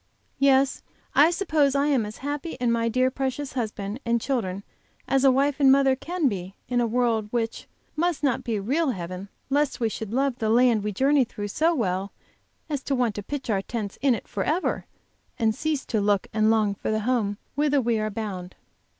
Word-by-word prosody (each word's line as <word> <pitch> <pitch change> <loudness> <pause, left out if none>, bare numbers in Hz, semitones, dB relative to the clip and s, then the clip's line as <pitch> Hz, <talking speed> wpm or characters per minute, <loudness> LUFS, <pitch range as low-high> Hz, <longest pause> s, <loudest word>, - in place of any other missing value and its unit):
Yes, 275 0 +3 0.3
I 300 +3 +6
suppose 315 -6 +1
I 280 0 +2
am 265 -7 +2
as 210 - -9
happy 295 +3 -3
in 245 -2 0
my 230 0 +1
dear, 255 +2 +2
precious 270 +1 -3
husband 215 -2 -3
and 235 0 +1
children 200 -7 -2 0.4
as 270 -1 +2
a 270 - +7
wife 275 +2 +1
and 270 -2 +6
mother 270 -1 +4
can 340 +3 -1
be 190 -4 -4
in 245 -1 +1
a 235 - +1
world, 230 -2 +1
which 230 -1 -3 0.3
must 335 -1 0
not 270 -4 +1
be 230 - -2
a 200 - -3
real 290 +8 +1
heaven 185 -2 -5 0.2
lest 290 0 +1
we 230 -2 +1
should 215 -1 -6
love 265 +1 0
the 220 - 0
land 235 -2 +4
we 210 - -1
journey 270 +6 +3
through 205 -3 -6
so 325 +10 +2
well 195 -5 -1 0.6
as 290 -4 -2
to 275 - 0
want 245 -4 +1
to 205 - -5
pitch 275 +7 -5
our 195 -2 +1
tents 210 -1 -5
in 270 -3 +4
it - - -8
forever, 310 - -1 0.5
and 220 -2 +2
cease 300 +3 -2
to 220 -3 0
look 200 -1 +2
and 215 0 +3
long 215 -2 +3
for 200 - -5
the 215 0 0
home 215 -3 0 0.2
whither 290 0 +2
we 235 -3 +1
are 215 0 -1
bound. 195 -4 -5
245 Hz, 205 wpm, -25 LUFS, 215-275 Hz, 0.6 s, a